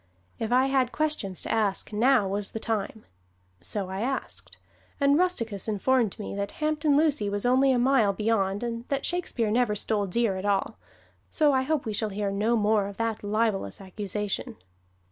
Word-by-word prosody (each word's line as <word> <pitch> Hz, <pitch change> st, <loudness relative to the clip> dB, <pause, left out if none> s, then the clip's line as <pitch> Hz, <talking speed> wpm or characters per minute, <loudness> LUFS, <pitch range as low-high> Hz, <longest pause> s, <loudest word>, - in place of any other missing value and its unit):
If 225 Hz, +1 st, -3 dB
I 255 Hz, +2 st, +4 dB
had 265 Hz, -2 st, +1 dB
questions 300 Hz, -, -1 dB
to -, -, -4 dB
ask, 215 Hz, -1 st, 0 dB
now 235 Hz, -1 st, +3 dB
was 200 Hz, +1 st, -3 dB
the 220 Hz, -, -5 dB
time! 220 Hz, -1 st, -3 dB, 0.6 s
So 190 Hz, -, -3 dB
I 190 Hz, +1 st, -3 dB
asked, 95 Hz, -, -4 dB, 0.4 s
and 280 Hz, 0 st, +4 dB
Rusticus 230 Hz, -, 0 dB
informed 220 Hz, +1 st, +1 dB
me 210 Hz, -, -6 dB
that 200 Hz, 0 st, -3 dB
Hampton 305 Hz, -1 st, +1 dB
Lucy 290 Hz, -9 st, +2 dB
was 205 Hz, +2 st, -2 dB
only 260 Hz, +2 st, +4 dB
a 255 Hz, -, +2 dB
mile 245 Hz, -4 st, +3 dB
beyond 205 Hz, -1 st, 0 dB
and 235 Hz, 0 st, -4 dB
that 275 Hz, -1 st, -2 dB
Shakespeare 265 Hz, -11 st, -1 dB
never 235 Hz, -2 st, +2 dB
stole 205 Hz, -1 st, -1 dB
deer 205 Hz, 0 st, 0 dB
at 185 Hz, -, -5 dB
all; 200 Hz, -1 st, 0 dB, 0.5 s
so 300 Hz, -3 st, +3 dB
I 260 Hz, -, +3 dB
hope 290 Hz, +1 st, -1 dB
we 220 Hz, -, -3 dB
shall 215 Hz, +1 st, -1 dB
hear 200 Hz, 0 st, -2 dB
no 215 Hz, +4 st, +1 dB
more 210 Hz, -2 st, +2 dB
of 200 Hz, -, -9 dB
that 230 Hz, -2 st, -2 dB
libelous 205 Hz, -, 0 dB
accusation. 200 Hz, +1 st, -4 dB
220 Hz, 180 wpm, -27 LUFS, 200-260 Hz, 0.6 s, I